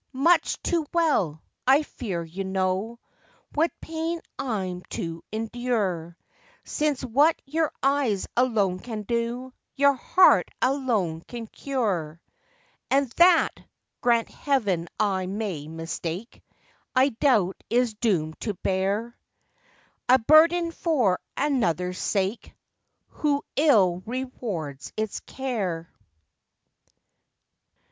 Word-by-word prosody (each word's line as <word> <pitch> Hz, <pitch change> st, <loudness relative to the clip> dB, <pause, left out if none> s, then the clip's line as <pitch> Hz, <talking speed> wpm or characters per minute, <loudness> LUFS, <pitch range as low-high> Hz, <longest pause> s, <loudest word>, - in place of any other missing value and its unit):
much 335 Hz, +5 st, +3 dB
too 340 Hz, -2 st, +1 dB
well, 205 Hz, -, +1 dB, 0.2 s
I 275 Hz, +4 st, +6 dB
fear, 195 Hz, -, -4 dB
you 170 Hz, +4 st, -6 dB
know 190 Hz, +4 st, -1 dB, 0.6 s
What 320 Hz, +3 st, +2 dB
pain 325 Hz, +1 st, -3 dB, 0.2 s
I'm 190 Hz, -8 st, -2 dB
to 165 Hz, -1 st, -5 dB
endure, 215 Hz, -7 st, -2 dB, 0.5 s
Since 295 Hz, -3 st, -1 dB
what 285 Hz, +7 st, +3 dB
your 315 Hz, +2 st, 0 dB
eyes 270 Hz, -8 st, +1 dB
alone 215 Hz, -7 st, +2 dB
can 220 Hz, 0 st, -6 dB
do 235 Hz, +3 st, -2 dB, 0.2 s
Your 280 Hz, 0 st, +5 dB
heart 365 Hz, +8 st, +4 dB
alone 235 Hz, -, 0 dB
can 235 Hz, -2 st, -6 dB
cure. 200 Hz, -, -2 dB, 0.7 s
And 275 Hz, -2 st, +2 dB
that 345 Hz, -1 st, +6 dB, 0.5 s
(grant 235 Hz, -2 st, +3 dB
Heaven, 205 Hz, -, 0 dB
I 190 Hz, -3 st, +1 dB
may 190 Hz, -7 st, -4 dB
mistake!) 165 Hz, +6 st, -5 dB, 0.5 s
I 260 Hz, +2 st, +5 dB
doubt 220 Hz, -7 st, +1 dB
is 240 Hz, -1 st, +2 dB
doom'd 180 Hz, -8 st, -1 dB
to 210 Hz, -3 st, -2 dB
bear 200 Hz, +6 st, -1 dB, 0.9 s
A 255 Hz, -, +8 dB
burden 330 Hz, +7 st, +5 dB
for 260 Hz, -, +1 dB, 0.2 s
another's 180 Hz, -, 0 dB
sake, 200 Hz, +2 st, -2 dB, 0.5 s
Who 285 Hz, -2 st, 0 dB
ill 205 Hz, -, +4 dB
rewards 210 Hz, -, -5 dB
its 215 Hz, -1 st, -2 dB
care. 195 Hz, -11 st, -4 dB
225 Hz, 100 wpm, -26 LUFS, 185-275 Hz, 0.9 s, A